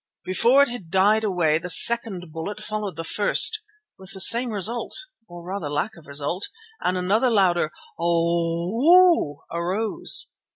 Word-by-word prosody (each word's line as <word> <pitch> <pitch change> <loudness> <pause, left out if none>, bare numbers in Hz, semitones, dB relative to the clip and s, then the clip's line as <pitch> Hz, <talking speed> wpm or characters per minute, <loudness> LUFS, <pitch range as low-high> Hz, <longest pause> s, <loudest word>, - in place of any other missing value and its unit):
Before 240 +9 +3
it 280 - -2
had 235 -9 -9
died 205 +4 +2
away 170 -6 0
the 180 +1 -8
second 190 -4 +2
bullet 165 +6 -7
followed 210 -4 -6
the 165 - -6
first, 210 - +3 0.4
with 190 0 -9
the - - -9
same 235 +5 +5
result 220 +3 +1 0.3
or 175 -1 -12
rather 180 -4 -6
lack 150 +10 -3
of 170 -4 -17
result, 145 +7 -3 0.3
and 180 +1 -2
another 205 +8 0
louder 180 -7 +1 0.3
"O 170 +1 -1
oh!" 340 - +3
arose. 195 - 0
185 Hz, 150 wpm, -22 LUFS, 170-220 Hz, 0.4 s, same